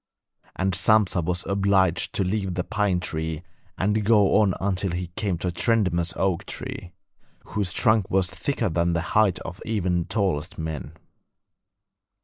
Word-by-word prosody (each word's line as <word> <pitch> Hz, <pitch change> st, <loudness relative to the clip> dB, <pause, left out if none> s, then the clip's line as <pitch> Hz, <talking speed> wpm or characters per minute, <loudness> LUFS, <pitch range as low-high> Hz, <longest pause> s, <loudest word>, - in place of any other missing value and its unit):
And 95 Hz, 0 st, 0 dB
Sampsa 100 Hz, -2 st, +3 dB
was 90 Hz, +2 st, -1 dB
obliged 95 Hz, -2 st, +2 dB
to 100 Hz, -, +1 dB
leave 95 Hz, -1 st, -2 dB
the 90 Hz, -, -1 dB
pine 105 Hz, -3 st, 0 dB
tree 80 Hz, -1 st, -3 dB, 0.3 s
and 105 Hz, +3 st, +1 dB
go 105 Hz, -2 st, +4 dB
on 95 Hz, -3 st, +2 dB
until 95 Hz, 0 st, -1 dB
he 90 Hz, 0 st, -4 dB
came 100 Hz, -5 st, -1 dB
to 90 Hz, +2 st, -2 dB
a -, -, -3 dB
tremendous 90 Hz, -4 st, +1 dB
oak 95 Hz, -3 st, 0 dB
tree, 90 Hz, -, -6 dB, 0.5 s
whose 100 Hz, -4 st, -2 dB
trunk 110 Hz, -1 st, +2 dB
was 95 Hz, -1 st, +2 dB
thicker 110 Hz, +5 st, -2 dB
than 85 Hz, +1 st, +1 dB
the 85 Hz, -, 0 dB
height 105 Hz, -4 st, +4 dB
of 90 Hz, -1 st, -8 dB
even 95 Hz, -5 st, 0 dB
the 85 Hz, -, -2 dB
tallest 95 Hz, -6 st, -1 dB
men. 80 Hz, -4 st, -5 dB
95 Hz, 155 wpm, -24 LUFS, 85-105 Hz, 0.5 s, go